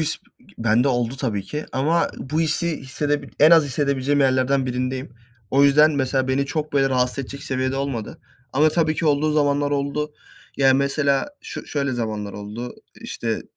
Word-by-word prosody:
his 155 Hz, -, -1 dB, 0.4 s
bende 115 Hz, +4 st, +3 dB
oldu 120 Hz, 0 st, 0 dB
tabi 115 Hz, -7 st, -2 dB
ki, 150 Hz, +11 st, -6 dB
ama 155 Hz, +6 st, +1 dB
bu 155 Hz, +5 st, -2 dB
hissi 165 Hz, +1 st, 0 dB
hissedip 140 Hz, -1 st, -3 dB
en 155 Hz, +2 st, +8 dB
az 165 Hz, -2 st, +7 dB
hissedebileceğim 140 Hz, 0 st, 0 dB
yerlerden 130 Hz, 0 st, +2 dB
birindeyim. 130 Hz, 0 st, -3 dB, 0.4 s
O 140 Hz, +1 st, +4 dB
yüzden, 150 Hz, +2 st, +6 dB
mesela 130 Hz, -1 st, 0 dB
beni 135 Hz, +1 st, +1 dB
çok 150 Hz, +1 st, -3 dB
böyle 135 Hz, -1 st, +3 dB
rahatsız 125 Hz, 0 st, 0 dB
edecek 140 Hz, +1 st, -6 dB
seviyede 130 Hz, -1 st, -2 dB
olmadı, 135 Hz, -5 st, -4 dB, 0.3 s
ama 150 Hz, +4 st, +4 dB
tabii 155 Hz, 0 st, +1 dB
ki 160 Hz, -, -1 dB
olduğu 150 Hz, +1 st, +2 dB
zamanlar 145 Hz, -1 st, +1 dB
oldu. 145 Hz, +1 st, -2 dB, 0.4 s
Ya, 135 Hz, -1 st, +4 dB
mesela 140 Hz, -, +1 dB
şö -, -, -8 dB
şöyle 140 Hz, -2 st, -1 dB
zamanlar 110 Hz, -4 st, -3 dB
oldu, 105 Hz, +4 st, -7 dB, 0.3 s
işte, -, -, -3 dB
140 Hz, 165 wpm, -22 LUFS, 130-145 Hz, 0.4 s, en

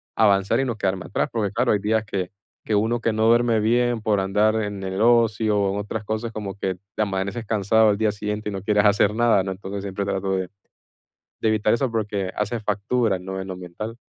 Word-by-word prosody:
avanzar, 100 Hz, +1 st, +3 dB
y 135 Hz, -, +1 dB
no 120 Hz, -3 st, -3 dB
quedarme 95 Hz, -2 st, -1 dB
atrás. -, -, -1 dB
Porque 105 Hz, -4 st, -1 dB
claro, 120 Hz, 0 st, +2 dB
hay 105 Hz, -, +1 dB
días 110 Hz, +2 st, +1 dB
que 95 Hz, -3 st, -3 dB, 0.3 s
que 110 Hz, -, -2 dB
uno 110 Hz, +3 st, +1 dB
que 115 Hz, -1 st, 0 dB
no 110 Hz, +1 st, +2 dB
duerme 115 Hz, -1 st, +4 dB
bien 120 Hz, +1 st, +1 dB
por 105 Hz, -2 st, +1 dB
andar 105 Hz, +3 st, +2 dB
en 105 Hz, -2 st, -3 dB
el 95 Hz, +1 st, -3 dB
ocio, 115 Hz, -2 st, +3 dB
o 100 Hz, -1 st, +1 dB
en -, -, -3 dB
otras 105 Hz, +1 st, -5 dB
cosas 110 Hz, +2 st, -3 dB
como 105 Hz, -3 st, -5 dB
que 95 Hz, -2 st, -3 dB, 0.2 s
te -, -, -1 dB
amaneces 100 Hz, +3 st, -3 dB
cansado 110 Hz, +1 st, +3 dB
al 100 Hz, -, +1 dB
día 110 Hz, -1 st, +2 dB
siguiente 105 Hz, 0 st, -4 dB
y -, -, -4 dB
no 95 Hz, -1 st, -5 dB
quieres 105 Hz, 0 st, +2 dB
hacer 105 Hz, 0 st, +4 dB
nada, 115 Hz, -4 st, +3 dB
¿no? 95 Hz, -, -3 dB
Entonces, 100 Hz, +1 st, -6 dB
siempre 100 Hz, 0 st, -3 dB
trato 95 Hz, -1 st, -2 dB
de 95 Hz, -1 st, -1 dB, 0.9 s
de 110 Hz, -, +1 dB
evitar 110 Hz, 0 st, +2 dB
eso 130 Hz, +2 st, +1 dB
porque 100 Hz, -4 st, -2 dB
hace 105 Hz, +3 st, -2 dB
factura, 105 Hz, 0 st, 0 dB
¿no? 95 Hz, +1 st, -6 dB
En 95 Hz, -, -6 dB
lo 95 Hz, -, -5 dB
mental. 100 Hz, +6 st, -7 dB
105 Hz, 225 wpm, -23 LUFS, 100-110 Hz, 0.9 s, duerme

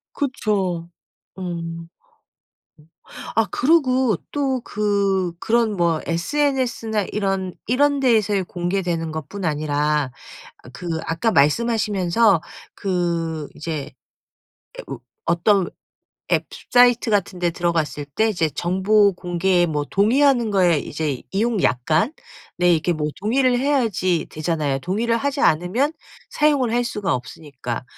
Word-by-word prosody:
그쵸. 195 Hz, -11 st, -1 dB, 0.5 s
음. 170 Hz, -2 st, -5 dB, 1.5 s
아 225 Hz, -, +4 dB
그러고 260 Hz, -, +3 dB
또 270 Hz, -3 st, 0 dB
그 200 Hz, -4 st, 0 dB
그런 225 Hz, 0 st, +1 dB
뭐 170 Hz, -2 st, +1 dB
SNS나 235 Hz, -, 0 dB
이런, 195 Hz, -3 st, -1 dB
이런 285 Hz, +4 st, +2 dB
데에서의 215 Hz, -6 st, +2 dB
공개되는 175 Hz, -2 st, -2 dB
것뿐 160 Hz, +5 st, -6 dB
아니라 150 Hz, -2 st, 0 dB, 0.5 s
어 -, -, -11 dB
그 175 Hz, -, -8 dB, 0.2 s
아까 165 Hz, +8 st, 0 dB
말씀하시면서 205 Hz, +2 st, +2 dB, 0.3 s
그 170 Hz, -5 st, -2 dB
이제 155 Hz, -2 st, -5 dB, 0.9 s
에 -, -, -6 dB
으 -, -, -5 dB, 0.3 s
어떤 190 Hz, +2 st, +2 dB, 0.6 s
앱 -, -, +2 dB, 0.2 s
사이트 245 Hz, -1 st, +5 dB
같은 200 Hz, -3 st, 0 dB
데 175 Hz, -1 st, +1 dB
들어갔을 165 Hz, -4 st, -1 dB
때 220 Hz, +11 st, 0 dB
이제 175 Hz, -7 st, 0 dB
정보 190 Hz, +6 st, +2 dB
공개에 175 Hz, 0 st, +1 dB
뭐 150 Hz, -3 st, -1 dB
동의하는 240 Hz, +3 st, +3 dB
거에 180 Hz, -5 st, +3 dB
이제 145 Hz, -2 st, -3 dB
이용 215 Hz, +1 st, 0 dB
약관 155 Hz, -, +1 dB, 0.4 s
네 180 Hz, 0 st, +4 dB
이렇게 170 Hz, +2 st, +1 dB, 0.3 s
동의를 250 Hz, +4 st, +2 dB
해야지 225 Hz, -, +1 dB
되잖아요. 155 Hz, -3 st, -1 dB
동의를 220 Hz, -, 0 dB
하지 280 Hz, +2 st, -2 dB
않으면 180 Hz, -, +2 dB, 0.4 s
사용을 290 Hz, -5 st, +2 dB
할 245 Hz, +1 st, +1 dB
수가 210 Hz, -, -1 dB
없으니까. 125 Hz, -1 st, -6 dB
190 Hz, 245 characters per minute, -21 LUFS, 165-230 Hz, 1.5 s, 사이트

